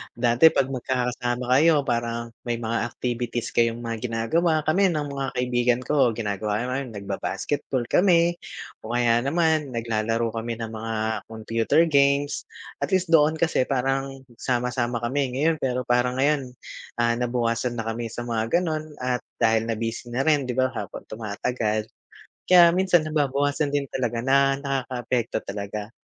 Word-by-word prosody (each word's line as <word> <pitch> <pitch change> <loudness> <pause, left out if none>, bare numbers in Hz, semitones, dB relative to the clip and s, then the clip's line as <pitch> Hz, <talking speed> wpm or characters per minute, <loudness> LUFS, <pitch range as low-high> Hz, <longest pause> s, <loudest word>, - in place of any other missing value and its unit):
dati 120 +6 +5
pag 135 - +1
magkakasama 125 -1 -2
kayo, 155 0 +5
parang 115 0 -2
may 120 -1 -2
mga 115 0 -1
activities 120 -1 -3
kayong 115 0 +2
mga 115 -1 -4
ginagawa. 160 +10 +1
kami 190 +4 +3
ng 150 -3 -2
mga 135 -1 -3
kaibigan 125 0 +1
ko, 135 -5 +3
ginagawa 105 +1 -2
namin, 130 -1 -3
nagba-basketball 100 +6 -3
kami 175 -2 +4 0.5
o 110 - -6
kaya 120 -1 +3
naman, 155 -1 +1
naglalaro 115 0 -1
kami 115 0 -4
ng 115 -1 -5
mga 110 +1 -4 0.4
computer 115 +7 +1
games. 140 -1 +2 0.4
At - - -3
least, 185 -1 +2
doon 155 0 +5
kasi 160 -5 +2
parang 135 0 -1
sama-sama 120 0 -1
kami. 130 +2 -1
Ngayon, 160 +4 +2
pero 125 -1 0
parang 125 +1 +1
ngayon, 140 -2 +1 0.5
ah, 115 0 +2
nabawasan 120 0 -1
na 115 - -3
kami 115 0 -3
sa 120 - -5
mga 115 +7 +1
gano'n, 155 -3 -3
at 125 -1 -1 0.2
dahil 110 -1 +3
na 115 - -1
busy 115 +1 -4
na 125 +3 0
rin 150 -3 +4
'di - - -1
ba, 130 0 +4
habang - - -6
tumatagal. 110 0 -2 0.6
Kaya 175 -2 +8
minsan, 180 -2 +3
nababawasan 145 -1 0
din 145 -1 0
talaga 120 -3 -1
na 135 +1 +4 0.2
nakakaapekto 130 -4 -2
talaga. 105 +2 -5
125 Hz, 150 wpm, -24 LUFS, 115-140 Hz, 0.6 s, Kaya